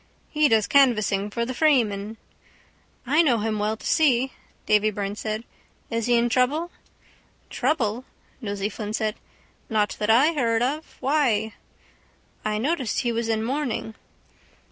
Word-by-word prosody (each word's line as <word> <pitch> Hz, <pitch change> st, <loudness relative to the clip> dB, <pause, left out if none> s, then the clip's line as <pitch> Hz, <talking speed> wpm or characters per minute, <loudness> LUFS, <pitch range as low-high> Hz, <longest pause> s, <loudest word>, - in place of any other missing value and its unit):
He 305 Hz, -1 st, +3 dB
does 220 Hz, -2 st, +3 dB
canvassing 215 Hz, -7 st, +3 dB
for 235 Hz, +3 st, -2 dB
the 255 Hz, -, -4 dB
Freeman. 225 Hz, -8 st, +1 dB, 0.9 s
—I 295 Hz, +6 st, +4 dB
know 265 Hz, -8 st, +3 dB
him 215 Hz, 0 st, -2 dB
well 215 Hz, +1 st, -1 dB
to -, -, -13 dB
see, 265 Hz, -5 st, +2 dB, 0.3 s
Davy 210 Hz, 0 st, +3 dB
Byrne 200 Hz, -1 st, -4 dB
said. 215 Hz, +1 st, -4 dB, 0.5 s
Is 230 Hz, 0 st, -1 dB
he 240 Hz, -, +4 dB
in 235 Hz, 0 st, +3 dB
trouble? 280 Hz, +8 st, +1 dB, 0.8 s
—Trouble? 250 Hz, -3 st, -1 dB, 0.4 s
Nosey 200 Hz, -2 st, -2 dB
Flynn 210 Hz, 0 st, -6 dB
said. 220 Hz, -1 st, 0 dB, 0.6 s
Not 210 Hz, -2 st, 0 dB
that 210 Hz, -, -1 dB
I 270 Hz, +9 st, +5 dB
heard 235 Hz, -5 st, +1 dB
of. 295 Hz, +5 st, -3 dB
Why? 250 Hz, -6 st, +1 dB, 0.9 s
—I 215 Hz, 0 st, -1 dB
noticed 260 Hz, -1 st, -1 dB
he 240 Hz, -, 0 dB
was 230 Hz, 0 st, -2 dB
in 220 Hz, -1 st, 0 dB
mourning. 250 Hz, -3 st, -2 dB
230 Hz, 145 wpm, -24 LUFS, 215-265 Hz, 0.9 s, I